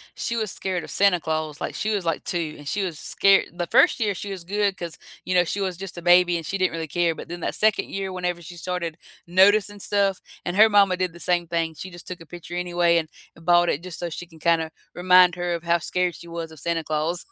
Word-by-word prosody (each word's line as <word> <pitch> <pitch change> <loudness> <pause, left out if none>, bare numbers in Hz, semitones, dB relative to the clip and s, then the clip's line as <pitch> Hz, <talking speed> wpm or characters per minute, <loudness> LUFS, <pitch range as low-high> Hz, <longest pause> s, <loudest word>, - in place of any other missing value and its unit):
She 235 - -2
was 215 -4 -1
scared 185 -3 -3
of - - -9
Santa 200 -3 +4
Claus, 155 -2 -3
like, - - -4
she 215 0 -1
was, 200 -4 -2
like, 165 -1 -1
2, 165 -4 -3
and 145 -1 -11
she 200 +6 -1
was 175 -5 -4
scare 195 0 +4
the 175 -1 -3
1st - - +4
year 210 -3 +1
she 200 +2 -6
was 185 -3 -6
good 200 0 0
'cause, 170 -2 -6 0.3
you 185 - -1
know, 180 - +6
she 195 +4 -3
was 190 -2 -1
just 195 -1 -8
a 175 - -5
baby 175 0 +5
and 165 - -6
she 195 - -2
didn't 185 -1 +1
really 165 -1 -4
care, 170 +2 +1
but - - -9
then, 175 +1 -7
that - - -2
2nd 215 0 +2
year, 195 -1 -4
whenever 180 -1 -3
she 175 +1 -10
started 170 -2 -4 0.3
noticing 205 +3 +4
stuff 200 -1 0 0.2
and 175 - -2
her 215 +2 +7
mama 200 -3 +4
did 185 -1 -1
the 170 - -13
same 175 -1 0
thing, 165 -1 -1
she 185 +5 -7
just 175 -1 -12
took 180 -2 -7
a - - -11
picture 175 +1 -9
anyway 175 -1 +2
and, 160 -2 -1 0.3
uh, - - -15
bought 175 +1 +4
it 150 - -1
just 185 -2 -6
so 175 -1 -3
she 175 - -7
can 165 -2 -17
kinda 165 -1 +1 0.2
remind 180 0 +5
her 175 0 -2
of 170 -1 -4
how 170 0 +3
scared 180 +1 -1
she 170 - -12
was 165 -1 -6
of 160 - -12
Santa 165 +2 -1
Claus. 155 +3 -2
175 Hz, 265 wpm, -24 LUFS, 170-185 Hz, 0.3 s, her